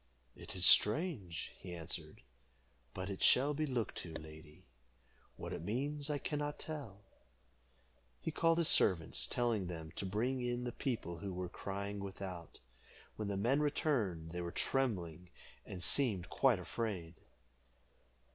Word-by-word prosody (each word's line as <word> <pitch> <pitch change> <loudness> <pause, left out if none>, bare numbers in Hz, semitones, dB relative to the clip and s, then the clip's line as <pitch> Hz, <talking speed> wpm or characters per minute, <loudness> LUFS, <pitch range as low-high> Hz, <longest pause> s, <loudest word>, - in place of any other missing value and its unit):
"It - - -6
is 90 -1 +6
strange," 105 - +4
he 90 -2 -7
answered, 80 -6 -5 0.7
"but 95 +7 -4
it 100 -1 -5
shall 140 +4 +5
be 155 +1 -1
looked 125 -5 -2
to, 85 - -7
lady. 75 -1 -10 0.7
What - - -6
it - - -4
means 140 - -2
I 150 - +1
can 150 +1 -2
not 145 0 -2
tell." 140 -11 -6 1.2
He 160 - -3
called 165 +1 +3
his 170 -2 +3
servants, 85 -5 +4
telling 115 -6 0
them 80 -2 -6
to - - -2
bring 120 +7 0
in 120 0 -1
the 120 - -2
people 115 - -3
who 100 -1 -4
were 90 0 -4
crying 100 +2 -4
without. 95 -4 -7 0.6
When 105 - -3
the 100 -1 -1
men 120 +8 +3
returned, 115 - 0
they 90 +1 -3
were 85 0 -3
trembling, 90 - -1 0.4
and 90 -3 -5
seemed 100 -5 +2
quite 130 -5 +4
afraid. 90 -3 -3
100 Hz, 145 wpm, -36 LUFS, 90-135 Hz, 1.2 s, is